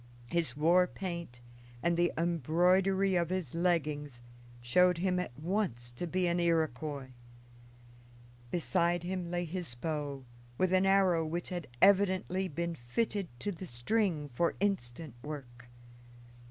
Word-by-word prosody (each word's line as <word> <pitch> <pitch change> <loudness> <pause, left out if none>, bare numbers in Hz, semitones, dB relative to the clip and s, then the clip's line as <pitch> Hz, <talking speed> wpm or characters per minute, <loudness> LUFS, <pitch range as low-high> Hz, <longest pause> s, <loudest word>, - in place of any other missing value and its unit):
His 165 -7 0
war 175 +4 +5
paint 170 -10 -6 0.4
and 170 0 +2
the 175 0 +2
embroidery 180 +4 +2
of 170 -2 +1
his 185 -8 -3
leggings 150 -6 0 0.4
showed 180 +9 +4
him 180 +1 +1
at 125 -9 -5
once 155 - -2
to 120 +9 -5
be 185 +2 0
an 175 0 +1
Iroquois. 155 -5 0 1.4
Beside 170 +2 +1
him 180 -1 -3
lay 175 0 -1
his 170 -6 -5
bow, 145 -1 -4 0.3
with 185 0 +2
an 185 +1 +4
arrow 190 -4 +4
which 165 +2 -3
had 175 -4 -4 0.2
evidently 190 -1 +4
been 170 +2 -3
fitted 180 - -2
to 205 - -1
the 185 0 -8
string 155 - 0
for 170 +8 +1
instant 160 - -2
work. 125 -5 -8
170 Hz, 130 wpm, -32 LUFS, 150-185 Hz, 1.4 s, war